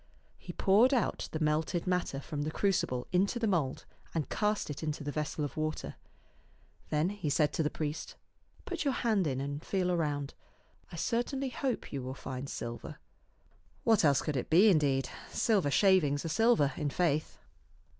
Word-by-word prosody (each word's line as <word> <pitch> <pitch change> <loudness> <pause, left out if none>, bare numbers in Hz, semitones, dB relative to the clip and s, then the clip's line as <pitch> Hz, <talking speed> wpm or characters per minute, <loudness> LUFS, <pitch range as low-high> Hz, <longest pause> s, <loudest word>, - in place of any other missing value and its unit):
He - - -8
poured 225 +8 +4
out 235 - -1
the 155 - -3
melted 155 +2 0
matter 180 -6 0
from 145 +1 -5
the 150 - -1
crucible 155 -9 0
into 195 +6 +2
the 235 - 0
mould 165 -10 0 0.3
and 160 -3 -1
cast 210 -6 0
it 145 - -6
into 155 -2 -3
the 145 - -3
vessel 150 0 -2
of 145 - -7
water. 155 0 -3 1.0
Then 155 +4 +1
he 200 -6 -3
said 150 +1 +2
to - - 0
the 150 - +1
priest, 155 0 -4 0.3
" - - -31
Put 355 -4 -3
your 275 -3 +1
hand 215 -7 +1
in 130 -2 -1
and 140 +2 -4
feel 185 -2 0
around. 145 -5 -1 0.6
I - - -7
certainly 245 - -1
hope 255 - -3
you 140 - -2
will 130 +1 -5
find 130 0 -6
silver." 120 0 -6 0.9
What 225 -5 +4
else 145 -3 +4
could 150 -3 -1
it 125 - -3
be, 185 +7 +7
indeed? 140 -7 +2 0.2
Silver 200 -10 +2
sL 170 - +2
ivings 160 -7 +4
are - - -2
silver, 220 - +3
in 150 - -1
faith. 155 -1 0
155 Hz, 180 wpm, -31 LUFS, 145-200 Hz, 1.0 s, be